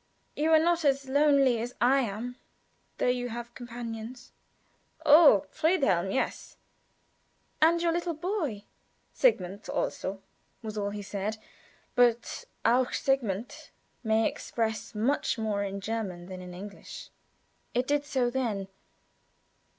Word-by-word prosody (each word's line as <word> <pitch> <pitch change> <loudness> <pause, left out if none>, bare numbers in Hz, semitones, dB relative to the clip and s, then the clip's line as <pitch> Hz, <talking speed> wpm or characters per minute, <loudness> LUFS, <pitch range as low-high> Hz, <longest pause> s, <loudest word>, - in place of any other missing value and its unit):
"You 310 +2 +1
are - - +9
not 340 +1 +2
as 275 -1 +2
lonely 275 -4 +4
as 245 +2 -5
I 260 +3 +4
am, 240 +1 -3 0.6
though; - - 0
you 245 0 0
have 240 +1 -7
companions." 240 0 -7 0.7
"I - - -32
oh 295 - +7
Friedhelm; 270 - +2
yes." 265 - -2 1.0
"And 330 +2 +5
your 340 - +3
little 340 0 -1
boy." 315 - -2 0.5
"Sigmund 200 - +1
also," 195 +1 -3 0.4
was 215 -1 -5
all 200 -1 -1
he 205 0 -6
said. 205 +2 -3 0.6
But 240 - +2 0.2
"auch 250 +1 +3
Sigmund" 240 -5 -1 0.3
may 220 0 +3
express 225 0 -3
much 240 +4 +1
more 215 -2 -1
in 200 0 -4
German 195 -5 -4
than 185 0 -8
in 180 -1 -9
English. 200 +2 -9 0.6
It 250 +1 +2
did 290 +1 +1
so 260 -4 0
then. 220 -7 -2
240 Hz, 125 wpm, -29 LUFS, 210-275 Hz, 1.0 s, are